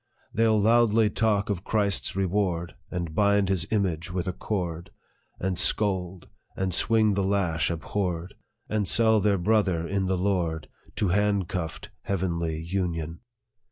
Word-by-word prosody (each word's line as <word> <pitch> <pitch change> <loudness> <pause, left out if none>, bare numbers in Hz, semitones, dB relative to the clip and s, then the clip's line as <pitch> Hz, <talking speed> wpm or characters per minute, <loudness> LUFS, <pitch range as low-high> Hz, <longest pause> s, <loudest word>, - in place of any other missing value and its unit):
They 115 +2 +2
'11 110 -2 +3
loudly 115 -1 +4
talk 105 -2 +1
of 95 -2 -3
Christ's 100 -4 0
reward, 95 -3 -1 0.2
And 85 -3 -4
bind 100 +1 +3
his 95 -2 0
image 90 -7 -1
with 90 0 -3
a 95 - -1
cord 85 -4 -4 0.5
v - - -4
And 95 -2 -1
scold, 95 -4 0 0.3
and 95 -1 -1
swing 110 +2 +3
the 100 - 0
lash 95 -4 +1
abhorred, 90 +1 -3 0.3
And 105 -2 -1
sell 110 +1 +4
their 100 -1 +2
brother 95 -3 +1
in 95 0 -1
the 95 0 0
Lord 90 -4 -1 0.3
To 105 -4 0
handcuffed 95 -5 -1
heavenly 85 -4 -2
union. 85 -2 -3
95 Hz, 145 wpm, -26 LUFS, 85-105 Hz, 0.5 s, loudly